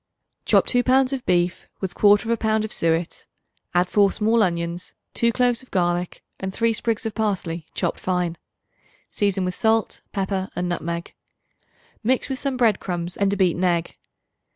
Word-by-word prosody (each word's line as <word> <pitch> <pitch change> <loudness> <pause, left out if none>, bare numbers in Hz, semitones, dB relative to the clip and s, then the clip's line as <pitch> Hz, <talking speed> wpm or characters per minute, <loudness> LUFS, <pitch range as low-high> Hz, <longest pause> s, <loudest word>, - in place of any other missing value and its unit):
Chop - - +4
2 245 - +2
pounds 260 +1 +3
of 260 -2 -3
beef 175 0 +1
with 190 -2 -3
1/4 215 +3 +3
pound 220 -1 +1
of 215 - -5
suet; 165 0 -1 0.5
add 175 +1 +4
4 200 0 +4
small 225 +2 +2
onions, 170 -2 -1 0.2
2 235 0 +2
cloves 245 +1 +1
of 260 - -17
garlic 175 -1 -1 0.2
and 190 0 -3
3 230 +3 +1
sprigs 225 0 -1
of 220 - -2
parsley 180 -7 -2
chopped - - -1
fine. 180 -2 -1 0.7
Season 195 -2 0
with 180 - -2
salt, 225 +2 +1
pepper 190 -1 -2
and 180 0 -1
nutmeg. 170 -1 -4 0.9
Mix 255 +5 +1
with 265 -1 -3
some 275 -1 -2
bread 225 -5 +3
crumbs 175 -1 -2
and 200 -1 +1
a 200 - -1
beaten 185 -1 +2
egg. 170 -2 0
195 Hz, 165 wpm, -23 LUFS, 175-225 Hz, 0.9 s, Chop